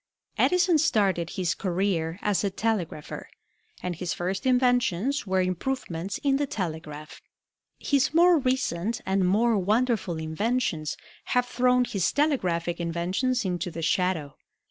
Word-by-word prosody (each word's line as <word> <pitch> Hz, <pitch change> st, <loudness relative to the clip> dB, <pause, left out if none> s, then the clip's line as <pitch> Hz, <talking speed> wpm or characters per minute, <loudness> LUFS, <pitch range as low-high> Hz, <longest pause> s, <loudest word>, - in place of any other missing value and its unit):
Edison 360 Hz, -3 st, +3 dB
started 195 Hz, -, +2 dB
his 180 Hz, -2 st, +1 dB
career 180 Hz, -3 st, -1 dB
as 200 Hz, -5 st, +1 dB
a 200 Hz, -, +1 dB
telegrapher, 190 Hz, -7 st, -3 dB, 0.5 s
and 180 Hz, -1 st, -2 dB
his 175 Hz, +1 st, -3 dB
first 190 Hz, +6 st, -2 dB
inventions 245 Hz, -, +2 dB
were 190 Hz, 0 st, +2 dB
improvements 185 Hz, -2 st, -3 dB
in 275 Hz, -1 st, +3 dB
the 290 Hz, 0 st, -1 dB
telegraph. 155 Hz, -, -6 dB, 0.6 s
His 280 Hz, -2 st, +1 dB
more 340 Hz, +1 st, +5 dB
recent 235 Hz, -6 st, -1 dB
and 190 Hz, 0 st, +1 dB
more 220 Hz, +3 st, +3 dB
wonderful 215 Hz, -3 st, +1 dB
inventions 160 Hz, 0 st, -1 dB, 0.4 s
have 250 Hz, -, +3 dB
thrown 250 Hz, 0 st, +2 dB
his 195 Hz, -6 st, 0 dB
telegraphic 180 Hz, -, 0 dB
inventions 185 Hz, +9 st, -1 dB
into 180 Hz, -1 st, -2 dB
the 165 Hz, -1 st, -6 dB
shadow. 165 Hz, -4 st, 0 dB
195 Hz, 125 wpm, -26 LUFS, 170-250 Hz, 0.6 s, more